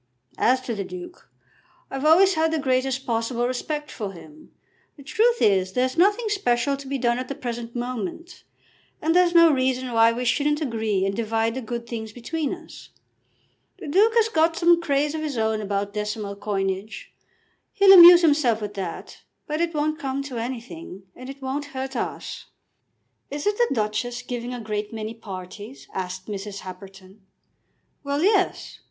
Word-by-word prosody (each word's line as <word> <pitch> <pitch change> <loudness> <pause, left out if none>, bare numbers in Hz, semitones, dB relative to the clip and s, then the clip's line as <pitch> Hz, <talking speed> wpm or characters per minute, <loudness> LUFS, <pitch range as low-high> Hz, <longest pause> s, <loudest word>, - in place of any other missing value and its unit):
As 255 +2 +3
to 255 -2 -4
the 200 -2 -3
Duke, 355 - -10 0.6
I've 270 +2 -3
always 370 +5 +6
had 320 -1 +1
the 320 - 0
greatest 265 -1 0
possible 235 +1 -1
respect 295 +4 -4
for 205 -4 -5
him. 305 - -15 0.5
The 280 - -13
truth 465 - +2
is, 190 -2 +2
there's 255 +1 0
nothing 410 +7 +3
special 275 -9 +1
to 275 0 -10
be 275 +1 -2
done 240 -1 +1
at 255 - -5
the 275 - -5
present 240 -3 -6
moment, 245 - -5 0.6
and 325 +2 0
there's 355 -1 +4
no 335 -1 +8
reason 255 -1 0
why 225 0 +5
we 245 +2 -3
shouldn't 295 +4 +1
agree 220 -8 -1
and 195 0 -1
divide 225 0 0
the 260 - -4
good 235 0 -5
things 220 -2 -6
between 290 +6 -3
us. 340 -3 -10 0.9
The - - -9
Duke 420 +9 +3
has 455 -1 +4
got 330 -6 +2
some 345 0 +4
craze 290 -1 0
of 315 - -3
his 295 -5 -3
own 220 -1 0
about 200 0 -2
decimal 210 -1 -4
coinage. 195 0 -4 0.6
He'll 395 -2 +7
amuse 350 -1 +10
himself 290 -8 +3
with 210 -1 -5
that; 190 -4 -7 0.2
but 305 +1 -2
it 340 -1 0
won't 305 +1 -1
come 275 -1 -3
to 260 -4 -5
anything, 215 -7 -7
and 255 +1 -10
it 275 0 -10
won't 275 +3 -3
hurt 265 0 -4
us." - - -5 0.8
"Isn't 295 +9 -1
the 480 - +3
Duchess 220 +2 -2
giving 245 0 -5
a 250 - -5
great 210 -1 -4
many 220 0 -5
parties?" 205 +3 -9
asked 185 0 -5
Mrs. 200 -1 -6
Happerton. 190 +1 -12 0.8
"Well; 285 +2 -1
yes. 395 -1 +1
255 Hz, 170 wpm, -24 LUFS, 215-305 Hz, 0.9 s, amuse